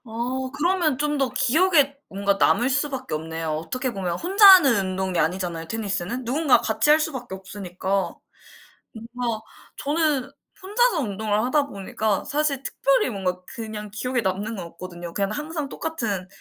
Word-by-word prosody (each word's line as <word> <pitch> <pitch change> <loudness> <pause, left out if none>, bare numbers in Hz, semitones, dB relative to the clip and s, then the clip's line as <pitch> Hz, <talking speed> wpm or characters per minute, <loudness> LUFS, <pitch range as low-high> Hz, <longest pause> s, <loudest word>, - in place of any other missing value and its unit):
어 250 +3 -3
그러면 310 0 +1
좀 295 0 0
더 270 -2 0
기억에 295 -1 +3
뭔가 200 +1 0
남을 245 +5 +3
수밖에 265 - 0
없네요. 160 +1 -4
어떻게 235 +12 -2
보면 180 -3 -3
혼자 395 +4 +5
하는 270 - +7
운동이 185 -1 -2
아니잖아요 170 0 -1
테니스는. 215 +2 -2
누군가 275 +3 +3
같이 225 +6 +2
할 305 +1 +6
수밖에 260 -10 -3
없으니까. 190 0 -3 0.8
뭔가 230 0 -4 0.4
저는 290 -3 0 0.3
혼자서 415 0 +2
운동을 215 -1 -1
하다 280 +3 +1
보니까 200 -1 -2
사실 290 -2 +1
특별히 - - +1
뭔가 185 -4 -3
그냥 215 -3 -6
기억에 250 +4 -1
남는 205 +3 -2
건 185 -4 -6
없거든요. 175 0 -9
그냥 200 +2 0
항상 300 +3 -4
똑같은 215 - -3
235 Hz, 345 characters per minute, -23 LUFS, 195-290 Hz, 0.8 s, 하는